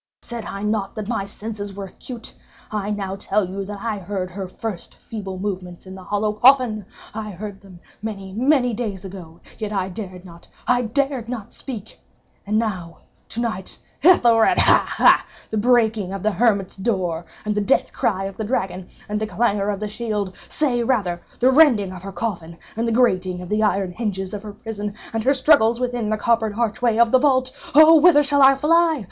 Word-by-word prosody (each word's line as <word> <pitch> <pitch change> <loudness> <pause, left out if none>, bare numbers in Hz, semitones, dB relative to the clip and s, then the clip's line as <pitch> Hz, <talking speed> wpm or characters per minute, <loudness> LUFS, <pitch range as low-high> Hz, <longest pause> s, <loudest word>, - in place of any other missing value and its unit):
_ - - -22
Said 235 -2 -6
I 200 +1 -6
not 210 -1 -1
that 215 -2 -5
my 220 -4 -2
senses 205 -1 -7
were 200 -1 -5
acute? 230 +5 -9 0.4
I 210 -1 -2
now 195 -2 -3
tell 200 0 0
you 195 +2 -4
that 200 0 -7
I 220 -3 -2
heard 185 -1 -4
her 190 +1 -5
first 195 0 -7
feeble 195 -4 -7
movements 185 -3 -5
in 190 - -9
the 190 -1 -10
hollow 210 +2 -1
coffin. 240 -3 +4 0.3
I 215 0 -5
heard 200 +1 -8
them—many, 195 +1 -9
many 250 +1 +2
days 205 -4 -4
ago—yet 190 +3 -9
I 195 -2 -1
dared 185 -2 -8
not—I 180 +8 -3
dared 265 0 -1
not 230 -5 -6
speak! 225 -6 -8 0.5
And 210 +1 +1
now—to 190 0 -5
night—Ethelred—ha! 230 - +3
ha!—the 220 - +2
breaking 220 -4 +2
of 195 - -5
the 215 - +2
hermit's 200 -4 +1
door, 185 -6 -1 0.2
and 210 - 0
the 210 - 0
death 235 +7 +1
cry 195 -3 0
of 195 0 -6
the 220 - -3
dragon, 190 -5 -2 0.2
and 210 0 -2
the 215 - -1
clangor 205 0 0
of 200 -2 -2
the 210 - -3
shield!—say, 220 +4 -2
rather, 200 -8 0 0.2
the 255 +2 +4
rending 255 -10 +5
of 180 - -9
her 195 +1 -7
coffin, 175 -4 -4 0.2
and 230 +2 -1
the - - +1
grating 185 -7 +2
of 180 0 -8
the 210 +1 +1
iron 195 -3 +1
hinges 195 -2 -4
of 205 - -4
her 210 -1 -8
prison, 210 -1 -6 0.2
and 225 -1 -1
her 275 - +4
struggles 255 -4 +4
within 245 -3 -2
the 215 - 0
coppered 220 -1 +1
archway 230 0 +1
of 235 -1 +4
the 260 - +6
vault! 260 -2 +2 0.2
Oh 315 +2 +9
whither 300 -2 +6
shall 285 0 +2
I 270 0 +7
fly? 320 +2 +3
210 Hz, 185 wpm, -22 LUFS, 195-235 Hz, 0.5 s, Oh